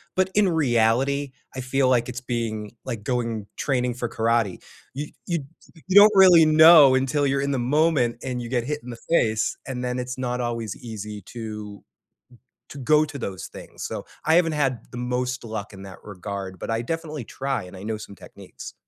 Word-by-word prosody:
But 185 Hz, 0 st, +1 dB
in 205 Hz, -2 st, +3 dB
reality, 135 Hz, -1 st, +1 dB, 0.2 s
I -, -, -4 dB
feel 130 Hz, +1 st, +1 dB
like 120 Hz, -2 st, +2 dB
it's 125 Hz, -, -6 dB
being 115 Hz, -4 st, -3 dB
like, 115 Hz, -5 st, -5 dB
going 115 Hz, -4 st, -2 dB
training 125 Hz, -3 st, 0 dB
for 120 Hz, 0 st, -4 dB
karate. 115 Hz, -5 st, 0 dB, 0.4 s
Y 150 Hz, +2 st, -5 dB, 0.2 s
y 170 Hz, -, +1 dB, 0.5 s
you 190 Hz, -, -1 dB
don't 205 Hz, +1 st, +9 dB
really 180 Hz, -4 st, +8 dB
know 155 Hz, -3 st, +8 dB
until 135 Hz, +2 st, +1 dB
you're 135 Hz, 0 st, 0 dB
in 140 Hz, 0 st, -1 dB
the 135 Hz, -, 0 dB
moment 135 Hz, -2 st, +2 dB
and 125 Hz, -2 st, -3 dB
you 120 Hz, -, -6 dB
get 120 Hz, -1 st, 0 dB
hit 150 Hz, +4 st, -3 dB
in 125 Hz, -, -9 dB
the 120 Hz, -, -7 dB
face, 110 Hz, -9 st, +2 dB
and 125 Hz, -2 st, -4 dB
then 125 Hz, 0 st, -2 dB
it's 125 Hz, 0 st, -5 dB
not 125 Hz, -1 st, -2 dB
always 115 Hz, -4 st, -3 dB
easy 105 Hz, -2 st, -8 dB
to 105 Hz, -3 st, -7 dB, 0.9 s
to 145 Hz, -, -10 dB
go 150 Hz, +3 st, +3 dB
to 145 Hz, -2 st, -7 dB
those 95 Hz, -7 st, -5 dB
things. -, -, -11 dB
So -, -, -5 dB, 0.2 s
I 160 Hz, -, +3 dB
haven't 170 Hz, -2 st, +3 dB
had 135 Hz, -6 st, 0 dB
the -, -, -8 dB
most 125 Hz, 0 st, -2 dB
luck 110 Hz, -3 st, -6 dB
in 95 Hz, -1 st, -11 dB
that 95 Hz, -1 st, -10 dB
regard, 100 Hz, -1 st, -6 dB
but -, -, -4 dB
I 115 Hz, +1 st, -1 dB
definitely 155 Hz, 0 st, -4 dB
try, 135 Hz, -2 st, -3 dB
and 90 Hz, +1 st, -11 dB
I 95 Hz, -, -10 dB
know 110 Hz, +1 st, -3 dB
some 105 Hz, -1 st, -10 dB
techniques. -, -, -12 dB
125 Hz, 195 wpm, -24 LUFS, 110-140 Hz, 0.9 s, don't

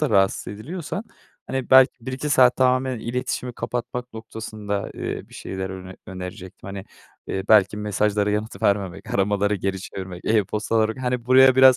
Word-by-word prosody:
da 150 Hz, -, +1 dB
rahatsız 95 Hz, 0 st, +2 dB
ediliyorsan, 165 Hz, -, -5 dB, 0.4 s
hani, 130 Hz, -1 st, -3 dB
belki 130 Hz, 0 st, +8 dB
1-2 130 Hz, +3 st, -3 dB
saat 125 Hz, -2 st, +6 dB
tamamen 130 Hz, -1 st, +2 dB
iletişimi 125 Hz, +1 st, -3 dB
kapatmak 125 Hz, +1 st, -4 dB
noktasında, 110 Hz, -2 st, -5 dB
eee, -, -, -5 dB
bir -, -, -16 dB
şeyler 95 Hz, 0 st, -5 dB
öner 95 Hz, 0 st, -8 dB
önerecektim. 95 Hz, +1 st, -8 dB
Hani, 100 Hz, 0 st, -6 dB, 0.4 s
eee, 95 Hz, -, -2 dB
belki 105 Hz, -1 st, +5 dB
mesajlara 105 Hz, 0 st, +1 dB
yanıt 105 Hz, -1 st, -3 dB
vermemek, 100 Hz, -3 st, 0 dB
aramaları 100 Hz, +1 st, +2 dB
geri 95 Hz, 0 st, -2 dB
çevirmek, 95 Hz, -2 st, -7 dB
e-postaları 110 Hz, +2 st, +1 dB
Hani, 125 Hz, -2 st, -2 dB
buraya 130 Hz, 0 st, +7 dB
biraz 130 Hz, -1 st, +8 dB
110 Hz, 150 wpm, -23 LUFS, 100-125 Hz, 0.4 s, belki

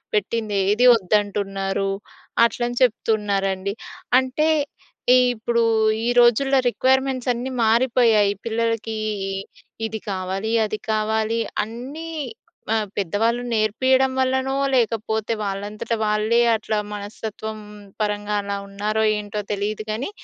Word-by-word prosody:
పెట్టింది 210 Hz, 0 st, -1 dB
ఏదీ 240 Hz, +5 st, +4 dB
వద్దంటున్నారు" 195 Hz, -1 st, 0 dB, 0.6 s
అట్లని 240 Hz, +1 st, -2 dB
చెప్తున్నారండి. 200 Hz, -4 st, 0 dB, 0.5 s
అంటే 260 Hz, +4 st, 0 dB, 0.7 s
ఈ -, -, +7 dB, 0.2 s
ఇప్పుడు 235 Hz, +1 st, 0 dB, 0.4 s
ఈ -, -, 0 dB
రోజుల్లో 265 Hz, +3 st, +4 dB
రిక్‌వైర్‌మెంట్స్ 260 Hz, 0 st, +1 dB
అన్నీ 245 Hz, +2 st, -4 dB
మారిపోయాయి. 230 Hz, -3 st, +4 dB
పిల్లలకీ 230 Hz, -1 st, -1 dB, 0.3 s
ఇ -, -, -3 dB, 0.5 s
ఇది 220 Hz, 0 st, -4 dB
కావాలి, 190 Hz, +3 st, -3 dB
అది 215 Hz, 0 st, -4 dB
కావాలి 220 Hz, +1 st, 0 dB, 0.3 s
అన్నీ 260 Hz, +9 st, -7 dB, 0.7 s
ఆహ్, 215 Hz, -2 st, 0 dB
పెద్దవాళ్ళు 215 Hz, +5 st, 0 dB
నేర్పియడం 260 Hz, +5 st, +2 dB
వల్లనో, 260 Hz, +1 st, +1 dB, 0.2 s
లేకపోతే 220 Hz, -2 st, 0 dB
వాళ్ళంతట 205 Hz, +3 st, -3 dB
వాళ్ళే 215 Hz, +2 st, +2 dB, 0.2 s
అట్లా 215 Hz, 0 st, -2 dB, 0.2 s
మనస్తత్వం 215 Hz, +1 st, -6 dB, 0.4 s
పరంగా 210 Hz, 0 st, -1 dB
అలా 200 Hz, 0 st, -3 dB
ఉన్నారో 210 Hz, +2 st, -1 dB, 0.2 s
ఏంటో 210 Hz, 0 st, -4 dB
తెలీదు 210 Hz, +1 st, -3 dB
కానీ, 230 Hz, -, -3 dB
220 Hz, 105 wpm, -22 LUFS, 205-240 Hz, 0.7 s, ఈ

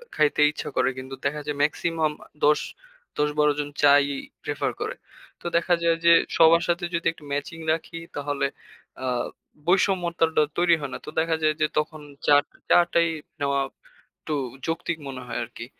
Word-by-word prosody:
খাইতে 150 Hz, 0 st, +3 dB
ইচ্ছা 150 Hz, -, -6 dB
করে। -, -, +3 dB
কিন্তু 130 Hz, +1 st, -7 dB
দেখা 150 Hz, +2 st, -1 dB
যায় 150 Hz, -1 st, -3 dB
মেক্সিমাম 155 Hz, +1 st, 0 dB, 0.3 s
দশ 150 Hz, 0 st, +5 dB, 0.6 s
১০-১২ 150 Hz, 0 st, +2 dB
জন 145 Hz, 0 st, -2 dB
চা-ই 140 Hz, -1 st, +5 dB, 0.3 s
প্রেফার -, -, -1 dB
করে। -, -, -2 dB, 0.5 s
তো -, -, -20 dB
দেখা 175 Hz, +1 st, +2 dB
যায় 165 Hz, 0 st, +3 dB
যে 170 Hz, -, +8 dB, 0.3 s
সবার 165 Hz, +1 st, +6 dB
সাথে 175 Hz, +1 st, 0 dB
যদি 170 Hz, -, -2 dB
একটু 155 Hz, -, -17 dB
ম্যাচিং 145 Hz, +3 st, -3 dB
রাখি 165 Hz, +1 st, -5 dB, 0.2 s
তাহলে 145 Hz, -1 st, -1 dB, 0.6 s
আ 130 Hz, -, -1 dB, 0.6 s
বৈষম্যতাটা 175 Hz, -4 st, +2 dB
তৈরি 175 Hz, -1 st, +5 dB
হয় 140 Hz, -, -4 dB
না। -, -, -3 dB
তো -, -, -6 dB
দেখা 160 Hz, 0 st, +1 dB
যায় 155 Hz, 0 st, +3 dB
যে 155 Hz, -, +4 dB
তখন 155 Hz, 0 st, -1 dB, 0.3 s
চা 145 Hz, -, +7 dB
টা -, -, -29 dB
চা -, -, +7 dB
টাই 170 Hz, 0 st, +4 dB, 0.3 s
নেওয়া 140 Hz, -1 st, +1 dB, 0.6 s
একটু 155 Hz, -, -4 dB, 0.3 s
যৌক্তিক 165 Hz, 0 st, -2 dB
মনে 130 Hz, -1 st, -6 dB
হয় -, -, -3 dB
আরকি। 120 Hz, 0 st, -9 dB
155 Hz, 165 wpm, -25 LUFS, 145-170 Hz, 0.6 s, যে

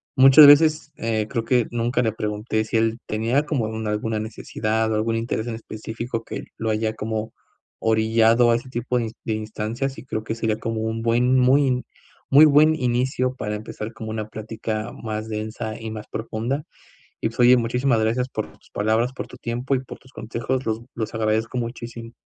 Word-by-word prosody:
muchas 135 Hz, +2 st, +9 dB
veces, 150 Hz, +1 st, +6 dB
eh, 110 Hz, -2 st, -1 dB
creo 115 Hz, -1 st, -2 dB
que 125 Hz, -2 st, +3 dB
nunca 120 Hz, +1 st, 0 dB
le 110 Hz, -, +1 dB
pregunté 110 Hz, +1 st, -2 dB
si 110 Hz, -, -1 dB
él 115 Hz, +1 st, +1 dB
tenía 115 Hz, +7 st, +1 dB
como 140 Hz, -7 st, -1 dB
alguna 110 Hz, 0 st, -2 dB
necesidad 110 Hz, 0 st, -2 dB
o -, -, +1 dB
algún 115 Hz, +1 st, 0 dB
interés 115 Hz, 0 st, -2 dB
en 115 Hz, -, -3 dB
específico 115 Hz, +1 st, -5 dB
que -, -, -6 dB
lo 115 Hz, -, -2 dB
haya 110 Hz, 0 st, 0 dB
como 110 Hz, 0 st, -4 dB, 0.5 s
orillado 115 Hz, +2 st, +4 dB
a -, -, +4 dB
ese 120 Hz, +2 st, -5 dB
tipo 125 Hz, 0 st, -2 dB
de 120 Hz, -, 0 dB
ins 110 Hz, -, -6 dB
de 110 Hz, -, 0 dB
instancias, 110 Hz, +5 st, -3 dB
y 110 Hz, -, -10 dB
creo 110 Hz, -4 st, -3 dB
que 110 Hz, -, -3 dB
sería 110 Hz, -2 st, -1 dB
como 115 Hz, 0 st, -3 dB
un 110 Hz, 0 st, -2 dB
buen 120 Hz, +3 st, +3 dB
muy 130 Hz, 0 st, +3 dB, 0.5 s
muy 145 Hz, +3 st, +8 dB
buen 155 Hz, +1 st, +6 dB
inicio 130 Hz, -1 st, 0 dB
para 105 Hz, -4 st, -3 dB
empezar 105 Hz, +1 st, -6 dB
como 110 Hz, -1 st, -7 dB
una 110 Hz, -1 st, -4 dB
plática 110 Hz, 0 st, -4 dB
más 110 Hz, -1 st, -3 dB
densa 110 Hz, +1 st, -4 dB
y 110 Hz, -1 st, -6 dB
más 110 Hz, -1 st, -7 dB
profunda. 115 Hz, +5 st, -3 dB, 0.6 s
Y -, -, +1 dB
pues 115 Hz, -, -6 dB
oye, 125 Hz, +1 st, +7 dB
muchísimas 120 Hz, +1 st, +1 dB
gracias 115 Hz, +4 st, 0 dB
por 110 Hz, -4 st, -3 dB
tus -, -, -25 dB
palabras, 110 Hz, +4 st, +1 dB
por -, -, -5 dB
tu 125 Hz, -, -12 dB
tiempo 120 Hz, +4 st, -2 dB
y 130 Hz, -, +1 dB
por 130 Hz, -, -10 dB
tus 130 Hz, +1 st, -21 dB
consejos, 120 Hz, +4 st, -3 dB
los 110 Hz, 0 st, -1 dB
los 110 Hz, -1 st, -4 dB
agradezco 110 Hz, +1 st, 0 dB
muchísimo. 115 Hz, -1 st, -6 dB
115 Hz, 190 wpm, -23 LUFS, 110-125 Hz, 0.6 s, muchas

